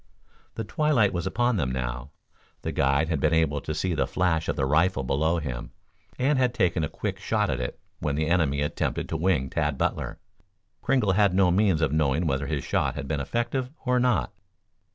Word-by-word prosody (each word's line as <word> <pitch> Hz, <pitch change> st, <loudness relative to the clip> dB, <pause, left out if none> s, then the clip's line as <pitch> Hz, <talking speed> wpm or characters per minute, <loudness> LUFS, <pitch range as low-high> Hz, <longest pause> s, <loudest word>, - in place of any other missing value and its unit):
The 115 Hz, -, -3 dB
twilight 145 Hz, -, +2 dB
was 85 Hz, -1 st, -2 dB
upon 120 Hz, -2 st, +1 dB
them 65 Hz, -7 st, 0 dB
now. 60 Hz, 0 st, -4 dB, 0.5 s
The -, -, -2 dB
guide 70 Hz, +3 st, +2 dB
had 80 Hz, -4 st, 0 dB
been 80 Hz, +3 st, +2 dB
able 75 Hz, -3 st, +1 dB
to 80 Hz, -, -4 dB
see 90 Hz, +3 st, -1 dB
the 80 Hz, -, 0 dB
flash 85 Hz, -3 st, 0 dB
of -, -, 0 dB
the 65 Hz, -, 0 dB
rifle 75 Hz, +2 st, +2 dB
below 80 Hz, +6 st, +1 dB
him, 65 Hz, -7 st, -5 dB, 0.4 s
and 135 Hz, +2 st, +2 dB
had 125 Hz, -2 st, +1 dB
taken 90 Hz, -6 st, +1 dB
a 75 Hz, -, -1 dB
quick -, -, -4 dB
shot -, -, 0 dB
at 65 Hz, -, -2 dB
it 60 Hz, -, -4 dB, 0.2 s
when 75 Hz, -1 st, -1 dB
the 75 Hz, +1 st, 0 dB
enemy 75 Hz, -4 st, +1 dB
attempted 75 Hz, -, -2 dB
to -, -, -2 dB
wing 80 Hz, -5 st, +1 dB
Tad 75 Hz, -1 st, -1 dB
Butler. -, -, -2 dB, 0.6 s
Kringle 130 Hz, -8 st, +2 dB
had 100 Hz, -1 st, +3 dB
no 95 Hz, -2 st, +4 dB
means 95 Hz, -3 st, +2 dB
of 80 Hz, -, +2 dB
knowing 75 Hz, +1 st, +1 dB
whether 70 Hz, -2 st, -1 dB
his -, -, -2 dB
shot -, -, 0 dB
had 70 Hz, -2 st, -5 dB
been 75 Hz, -1 st, -1 dB
effective 120 Hz, -, -2 dB, 0.2 s
or 125 Hz, 0 st, +2 dB
not. 120 Hz, -5 st, +1 dB
80 Hz, 200 wpm, -26 LUFS, 70-100 Hz, 0.6 s, no